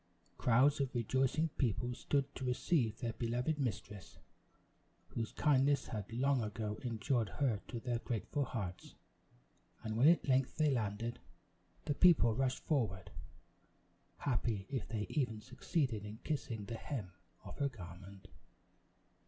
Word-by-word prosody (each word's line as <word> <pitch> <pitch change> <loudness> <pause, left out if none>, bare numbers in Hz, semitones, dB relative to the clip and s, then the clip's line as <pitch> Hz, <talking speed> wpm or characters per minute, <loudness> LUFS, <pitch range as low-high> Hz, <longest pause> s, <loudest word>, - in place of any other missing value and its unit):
Crowds 130 +5 +4
of 135 -2 -2
rejoicing 130 +7 +1
people 120 0 +1
stood 140 +3 0
to - - -6
receive 125 -2 +1
their 115 -3 -3
beloved 125 +7 -1
mistress, 105 -5 -4 0.9
whose 115 -1 -3
kindness 140 -1 +3
had 105 -2 -5
long 130 +2 +2
ago 105 0 -3
endeared 115 -1 0
her 120 -8 0
to 120 - -4
their 120 -1 -1
grateful 125 +5 -2
hearts; 100 -8 -5 0.9
and, 110 -1 -3
when 125 +6 +6
at 170 -1 +5
length 130 -1 +2
they 155 -2 +4
landed, 115 0 -1 0.7
the 145 - +1
people 145 -9 +6
rushed 130 +1 -1
forward 110 - 0 1.1
happy 115 -7 0
if 130 -5 -2
they 105 -1 -2
even 125 -7 -1
succeeded 125 - -1
in 105 +1 -7
kissing 115 -8 -3
the 115 +3 -5
hem 110 -9 -5 0.3
of - - -9
her 140 -1 +2
garment. 95 -2 -10
120 Hz, 135 wpm, -36 LUFS, 110-135 Hz, 1.1 s, when